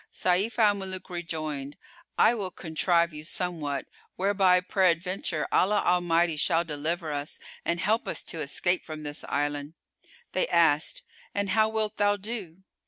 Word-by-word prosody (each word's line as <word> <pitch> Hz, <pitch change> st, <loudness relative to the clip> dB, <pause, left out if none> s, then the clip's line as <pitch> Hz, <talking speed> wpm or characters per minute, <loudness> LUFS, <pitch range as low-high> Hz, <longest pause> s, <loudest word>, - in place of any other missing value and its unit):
Sayf 185 Hz, +6 st, +1 dB
al 215 Hz, -3 st, +5 dB
Muluk 190 Hz, -2 st, -5 dB
rejoined, 155 Hz, -5 st, -4 dB, 0.4 s
"I 230 Hz, -, +6 dB
will 200 Hz, -5 st, -3 dB
contrive 170 Hz, 0 st, +1 dB
you 150 Hz, 0 st, -7 dB
somewhat, 155 Hz, -4 st, -3 dB, 0.3 s
whereby 190 Hz, -1 st, +4 dB
peradventure 180 Hz, -2 st, 0 dB
Allah 205 Hz, +3 st, +3 dB
Almighty 175 Hz, -2 st, +2 dB
shall 165 Hz, +2 st, +2 dB
deliver 160 Hz, +1 st, -3 dB
us 145 Hz, 0 st, -4 dB, 0.2 s
and 170 Hz, 0 st, -1 dB
help 215 Hz, +5 st, +1 dB
us -, -, -1 dB
to 165 Hz, -, -5 dB
escape 175 Hz, +5 st, 0 dB
from 155 Hz, -1 st, -7 dB
this 145 Hz, 0 st, -3 dB
island." 145 Hz, +1 st, -2 dB, 0.6 s
They 185 Hz, -, +1 dB
asked, 160 Hz, -3 st, +2 dB, 0.3 s
"And 200 Hz, -1 st, 0 dB
how 220 Hz, +1 st, +4 dB
wilt 220 Hz, -1 st, -2 dB
thou 205 Hz, 0 st, +3 dB
do?" 195 Hz, -4 st, -6 dB
175 Hz, 145 wpm, -27 LUFS, 155-195 Hz, 0.6 s, I